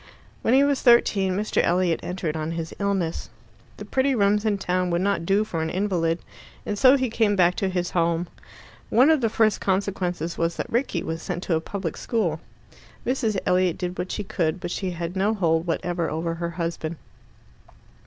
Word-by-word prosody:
When 235 - +3
he 275 - +6
was 280 -1 +1
thirteen 195 -6 +4
Mr. 210 +1 +1
Elliot 175 -1 +1
entered 175 -3 -3
on 160 +1 -3
his 165 -1 -5
illness. 195 -5 -1 0.5
The - - -8
pretty 265 0 +1
rooms 205 0 +2
in 210 -2 +2
town 180 -1 0
would 170 0 0
not 195 -4 0
do 200 +2 +3
for 170 -6 -3
an 160 - -1
invalid, 175 -3 0 0.5
and 205 - -2
so 260 +6 +6
he 260 -1 0
came 220 -2 +1
back 180 -2 +4
to 195 - 0
his 180 -1 -2
home. 170 0 +1 0.6
One 260 +7 +5
of 310 -4 +3
the 225 - +2
first 215 -1 +2
consequences 185 -3 -1
was 165 0 0
that - - -5
Rickie 235 -8 0
was 165 0 -4
sent 175 +1 -4
to 170 - 0
a 160 - 0
public 185 -2 -4
school. 175 -10 -1 0.6
Mrs. 235 -5 0
Elliot 180 -2 +2
did 180 0 -4
what 180 +1 -3
she 210 - -3
could, 170 -2 -1
but 175 -1 -5
she 190 0 -2
had 170 0 -5
no 200 +4 +1
hold 165 -3 +1
whatever 170 0 -1
over 165 +2 -2
her 170 0 -3
husband. 170 -1 -4
185 Hz, 195 wpm, -24 LUFS, 170-210 Hz, 0.6 s, he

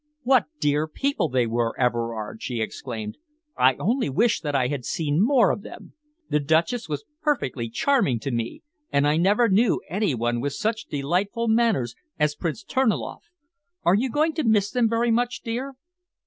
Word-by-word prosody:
"What 260 0 +4
dear 150 +1 +1
people 225 - -1
they 125 -2 +2
were, 115 0 -1
Everard!" 115 -3 -1
she 120 -3 -3
exclaimed. 110 -1 -5 0.4
"I 130 +1 +4
only 235 - 0
wish 225 - +2
that 145 -3 -2
I 130 -2 +2
had 135 -1 -3
seen 155 +6 0
more 245 -2 +4
of - - -3
them. - - -11 0.3
The 150 - +1
Duchess 165 - +1
was 150 +7 -4 0.2
perfectly 140 - -1
charming 145 - +1
to 135 - -3
me, 115 -1 -3 0.3
and 140 +1 +3
I 150 +1 +2
never 205 +7 +4
knew 210 +1 +3
any 190 -3 0
one 120 0 -1
with 140 +1 -2
such 215 +9 -2
delightful 190 - -1
manners 220 - +2 0.2
as 150 -1 +2
Prince 170 +6 -4
Terniloff. 260 -5 -1 0.6
Are 175 - +4
you 240 +7 +2
going 310 +5 +1
to 315 - -1
miss 210 -4 +2
them 240 -3 +2
very 230 +1 +1
much, 245 +1 0
dear?" 255 +4 -4
170 Hz, 175 wpm, -24 LUFS, -, 0.6 s, What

